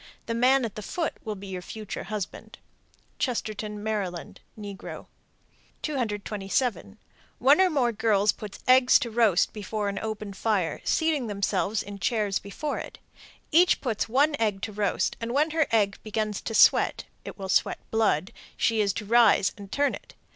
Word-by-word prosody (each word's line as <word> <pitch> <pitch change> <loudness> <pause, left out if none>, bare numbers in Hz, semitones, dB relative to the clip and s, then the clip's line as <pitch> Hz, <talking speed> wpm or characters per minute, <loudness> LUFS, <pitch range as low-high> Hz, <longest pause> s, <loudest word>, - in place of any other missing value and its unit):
The 230 - -2
man 255 +2 +3
at 220 - -5
the 215 - -7
foot 330 - -2
will 215 -1 -4
be 200 0 -10
your 185 -2 -5
future 215 +3 -7
husband. 210 0 -6 0.6
Chestertown, 215 -4 -2
Md. 200 -5 -3 0.2
(negro). 200 -2 -8 0.8
227. 210 - -2 0.4
One 280 +8 +5
or 375 - +5
more 265 -7 +1
girls 210 -2 +2
put 210 -2 -9
eggs 255 0 +6
to 235 - -4
roast 220 -5 +3
before 210 0 -3
an 200 - -3
open 215 -2 -5
fire, 195 -6 -1
seating 315 -6 +1
themselves 200 0 -1
in 200 0 -9
chairs 210 -3 0
before 285 +10 -4
it. - - -8 0.5
Each 350 +3 +5
puts 225 -3 -2
one 290 +5 +3
egg 210 -3 0
to 220 - -3
roast, 205 -2 0
and 235 +2 -3
when 305 +3 +2
her 315 -2 +2
egg 205 -3 +1
begins 215 -1 -3
to 225 - -4
sweat - - +5 0.2
(it - - -8
will 195 -2 -6
sweat 190 - +2
blood), 220 -3 +1 0.2
she 225 -2 +2
is 200 -2 +1
to 210 - -5
rise 225 -3 +5
and 200 -1 -11
turn 285 0 +1
it. - - -10
215 Hz, 165 wpm, -26 LUFS, 200-240 Hz, 0.8 s, eggs